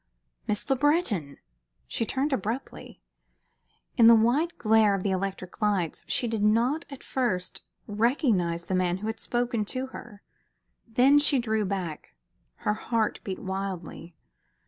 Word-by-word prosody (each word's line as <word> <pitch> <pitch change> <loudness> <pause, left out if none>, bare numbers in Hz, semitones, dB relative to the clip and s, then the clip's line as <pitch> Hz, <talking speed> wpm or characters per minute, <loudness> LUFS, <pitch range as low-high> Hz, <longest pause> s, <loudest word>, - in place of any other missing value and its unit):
"Miss 210 -2 -2
Le 270 - +2
Breton!" 250 - +1 0.5
She 230 - -2
turned 275 +2 0
abruptly. 230 - -5 0.9
In 230 - +7
the 230 - +9
white 260 +10 +2
glare 215 -2 +4
of 190 - -4
the 200 - 0
electric 190 +1 -4
lights 200 -6 0
she 245 - 0
did 225 -2 -2
not 235 +9 +2
at 275 -2 -10
first 210 -9 -2 0.2
recognize 205 - +1
the - - -3
man 180 -1 +1
who 205 - -7
had 220 0 -3
spoken 240 -2 -1
to 255 +5 -3
her. 210 -4 -11 0.6
Then 255 +5 +5
she 290 -1 +3
drew 220 -3 0
back. 180 - -5 0.5
Her 210 - +3
heart 220 0 -1
beat 190 -2 -4
wildly. 190 -3 -5
215 Hz, 145 wpm, -27 LUFS, 190-245 Hz, 0.9 s, the